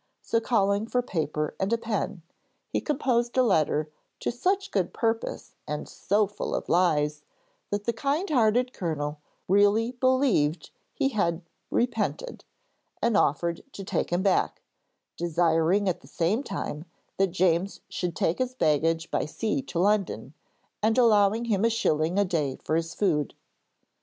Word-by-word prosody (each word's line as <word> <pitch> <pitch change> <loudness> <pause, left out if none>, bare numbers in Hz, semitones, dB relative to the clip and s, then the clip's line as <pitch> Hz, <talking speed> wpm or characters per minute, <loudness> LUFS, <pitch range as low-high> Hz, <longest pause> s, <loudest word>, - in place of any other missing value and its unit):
So 230 - +1
calling 205 -2 +1
for 250 +1 0
paper 155 -7 -2
and 190 +3 0
a 230 - +3
pen, 210 -6 -3 0.5
he - - +1
composed 250 -5 0
a 255 - +6
letter 155 -7 +1 0.3
to - - 0
such 380 +11 0
good 190 -4 -1
purpose 225 -1 -2
and 150 0 -4
so 205 +2 +1
full 205 +1 -4
of - - -3
lies, 150 -4 +2 0.5
that 205 0 -2
the 235 - 0
kindhearted 255 - +1
Colonel 150 -4 -3 0.3
really 205 +4 +4
believed 250 - +1 0.2
he 270 - 0
had 180 -7 0 0.3
repented, 360 - -1 0.6
and 235 -2 +1
offered 170 -1 +1
to 195 - -7
take - - -1
him 175 +2 +1
back, 195 -2 +1 0.5
desiring 170 +3 +2
at 180 - -1
the - - -16
same 175 - 0
time 155 - -5 0.3
that 195 - +3
James 180 +1 +1
should 175 -3 -3
take 165 - 0
his 255 0 -1
baggage 165 - +1
by - - 0
sea 225 - -1
to 255 - -7
London, 185 - +1 0.5
and 220 +2 +2
allowing 220 -1 +4
him 210 -3 +1
a 230 - +4
shilling 165 -6 +1
a 205 - +4
day 155 -7 -1
for 155 - 0
his 165 +1 -2
food. 155 -8 0
200 Hz, 150 wpm, -27 LUFS, 165-230 Hz, 0.6 s, a